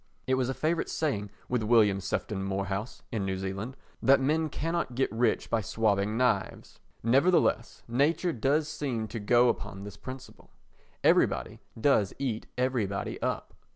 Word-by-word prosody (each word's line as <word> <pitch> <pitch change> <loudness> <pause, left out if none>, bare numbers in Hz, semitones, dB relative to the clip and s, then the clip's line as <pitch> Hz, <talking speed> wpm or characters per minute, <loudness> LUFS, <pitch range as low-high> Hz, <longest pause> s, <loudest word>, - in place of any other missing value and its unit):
It 130 - +1
was 130 -1 +1
a 135 - -2
favourite 160 +2 0
saying 105 -10 -1 0.2
with 125 -2 0
William 105 -3 +4
Sefton 95 +1 -2
Moorhouse 95 +3 -3
[in 110 -5 -1
New 95 -1 -2
Zealand] 100 +7 -5 0.2
that 135 +1 +6
men 155 +4 +1
cannot 165 -4 -2
get 135 - +1
rich 115 0 +1
by 115 - +2
swopping 105 0 0
knives. 120 -6 -1 0.2
Nevertheless 135 +10 +2
nature 150 +8 +1
does 145 +6 +1
seem 130 -8 -3
to 115 - -5
go 120 +4 +4
upon 100 -4 -2
this 100 0 -9
principle. 130 0 -10 0.5
Everybody - - +2 0.2
does 110 -7 +3
eat 120 -6 -3
everybody 120 -6 -1
up. - - -2
120 Hz, 150 wpm, -29 LUFS, 105-135 Hz, 0.5 s, that